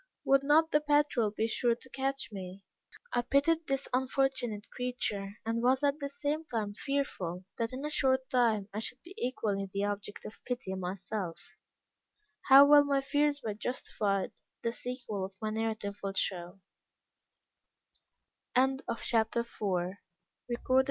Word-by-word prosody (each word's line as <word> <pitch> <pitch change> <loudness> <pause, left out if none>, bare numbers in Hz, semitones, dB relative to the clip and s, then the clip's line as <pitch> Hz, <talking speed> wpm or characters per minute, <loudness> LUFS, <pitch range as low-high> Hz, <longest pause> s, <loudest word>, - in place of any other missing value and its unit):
would 275 0 +5
not 315 +3 +4
the 300 - +4
patrol 290 -6 +3
be 215 +2 -1
sure 235 +1 +2
to 245 - -15
catch 270 0 -2
me?" 190 -1 -7 0.5
I 245 - +3
pitied 315 +6 +2
this 275 0 -1
unfortunate 255 -4 0
creature, 210 -5 -3
and 230 +1 0
was 260 +3 +3
at 285 +1 +2
the 280 -1 -3
same 290 +2 -2
time 215 -6 -2
fearful 195 -9 -2
that, 230 0 0
in 265 +3 -5
a 300 - -2
short 260 -2 +2
time, 225 -5 +3
I 210 - -2
should 245 +3 -3
be 345 - -12
equally 210 - -1
the 200 +1 0
object 205 0 -4
of 215 - -10
pity 245 -6 -3
myself. 185 -1 -4 0.9
How 275 +1 +10
well 290 0 +8
my 280 -1 +1
fears 290 +1 +1
were 215 - -2
justified 205 -3 -1 0.3
the 230 - 0
sequel 240 -6 -4
of 190 0 -6
my 215 -1 -2
narrative 215 -2 -2
will 195 -1 -3
show. 180 0 -2
240 Hz, 140 wpm, -31 LUFS, 205-275 Hz, 0.9 s, How